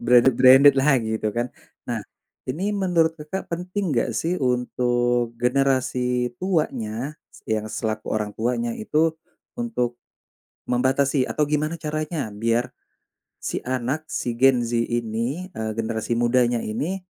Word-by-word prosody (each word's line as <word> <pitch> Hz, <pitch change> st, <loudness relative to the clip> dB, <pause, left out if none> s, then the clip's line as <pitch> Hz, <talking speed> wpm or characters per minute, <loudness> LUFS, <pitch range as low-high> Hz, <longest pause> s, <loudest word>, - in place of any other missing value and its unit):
branded-branded-lah, 130 Hz, +3 st, +6 dB, 0.2 s
gitu, 110 Hz, -1 st, -1 dB
kan. 120 Hz, +1 st, -1 dB, 0.3 s
Nah, -, -, -3 dB, 0.5 s
ini 180 Hz, +11 st, -1 dB
menurut 175 Hz, -5 st, +2 dB
Kakak 155 Hz, +6 st, -5 dB
penting 180 Hz, 0 st, -2 dB
enggak 120 Hz, 0 st, +1 dB
sih 170 Hz, +7 st, 0 dB
untuk 120 Hz, -1 st, +1 dB
generasi 125 Hz, -1 st, +1 dB
tuanya, 140 Hz, -, -1 dB, 0.3 s
yang 110 Hz, 0 st, -1 dB
selaku 110 Hz, 0 st, -3 dB
orang 105 Hz, -1 st, -2 dB
tuanya 125 Hz, -, -1 dB
itu, 165 Hz, -9 st, +1 dB, 0.5 s
untuk 125 Hz, -, -2 dB, 0.7 s
membatasi, 130 Hz, +2 st, +2 dB
atau 150 Hz, -, +1 dB
gimana 150 Hz, +2 st, 0 dB
caranya 155 Hz, -1 st, -3 dB
biar 115 Hz, +3 st, 0 dB, 0.6 s
si -, -, -4 dB
anak, 130 Hz, +5 st, -2 dB
si 120 Hz, -, -2 dB
Gen 130 Hz, -1 st, +5 dB
Z 120 Hz, +1 st, -3 dB
ini, 120 Hz, +8 st, -2 dB
eee, 110 Hz, 0 st, -3 dB
generasi 115 Hz, +1 st, -1 dB
mudanya 120 Hz, 0 st, +3 dB
ini, 150 Hz, -, -2 dB
125 Hz, 120 wpm, -23 LUFS, 120-155 Hz, 0.7 s, branded-branded-lah